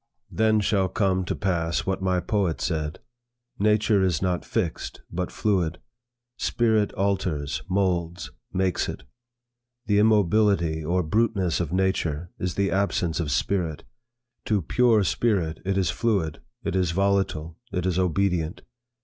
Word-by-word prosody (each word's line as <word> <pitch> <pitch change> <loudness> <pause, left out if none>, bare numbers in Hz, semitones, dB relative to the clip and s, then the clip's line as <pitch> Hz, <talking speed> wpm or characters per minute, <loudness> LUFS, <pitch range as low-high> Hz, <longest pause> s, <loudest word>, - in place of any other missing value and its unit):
Then 110 -1 +3
shall 100 -3 +1
come 95 -1 +1
to - - -2
pass 85 -5 -1
what 95 0 -1
my 95 -1 +1
poet 95 -2 0
said; 80 -3 -2 0.6
'Nature 105 0 +3
is 90 -4 +2
not 90 -2 -1
fixed 90 -8 -3
but 90 +1 -3
fluid. 90 -6 0 0.6
Spirit 110 -3 +2
alters, 95 -7 -1
moulds, 85 -3 -1 0.2
makes 95 -1 0
it. - - -6 0.8
The 105 -1 +3
immobility 100 -6 +3
or 90 +4 +1
bruteness 100 -1 +1
of 85 -3 -2
nature, 90 -3 0
is 90 -2 -2
the 100 -2 +1
absence 90 -4 0
of 80 -4 -1
spirit; 85 -2 -1 0.6
to 105 -4 +1
pure 115 +3 +3
spirit, 90 -6 0
it 95 0 0
is 95 -4 +2
fluid, 95 -10 -1 0.2
it 100 -3 -2
is 90 -2 +2
volatile, 95 -4 0
it 90 -2 -2
is 90 -1 +1
obedient. 90 -1 0
95 Hz, 135 wpm, -25 LUFS, 85-100 Hz, 0.8 s, Then